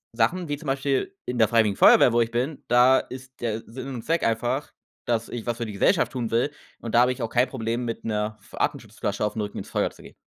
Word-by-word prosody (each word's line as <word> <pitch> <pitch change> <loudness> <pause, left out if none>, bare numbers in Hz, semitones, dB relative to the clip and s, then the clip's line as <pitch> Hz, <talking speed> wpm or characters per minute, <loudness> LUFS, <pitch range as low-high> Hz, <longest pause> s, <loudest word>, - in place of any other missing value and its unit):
Sachen 160 +10 +1
wie 145 - -1
zum 155 -2 -10
Beispiel 135 +6 -1
in 125 0 -3
der 110 - +6
freiwilligen 110 -4 +3
Feuerwehr, 120 - +7
wo 120 - +4
ich 115 - +1
bin, 130 +5 -2
da 125 +2 +6
ist 130 0 -9
der 115 -1 -2
Sinn 130 +3 -8
und 115 - -6
Zweck 165 +2 +1
einfach, 120 +5 -1 0.3
dass 115 -1 0
ich 120 -2 -6
was 120 - -1
für 115 - -3
die 105 - -6
Gesellschaft 160 - +2
tun 120 -4 -3
will, 120 +5 +1 0.3
und 115 - -6
da 120 - +7
habe 125 - +4
ich 125 0 -5
auch 115 - -2
kein 125 +1 +2
Problem, 120 -1 -2
mit 115 - -4
'ner 105 0 -2
Atemschutzflasche - - -2
auf 105 - -3
'n 110 - -2
Rücken 105 -1 -5
ins - - -8
Feuer - - 0
zu - - -17
gehen. - - -13
120 Hz, 250 wpm, -25 LUFS, 115-130 Hz, 0.3 s, Feuerwehr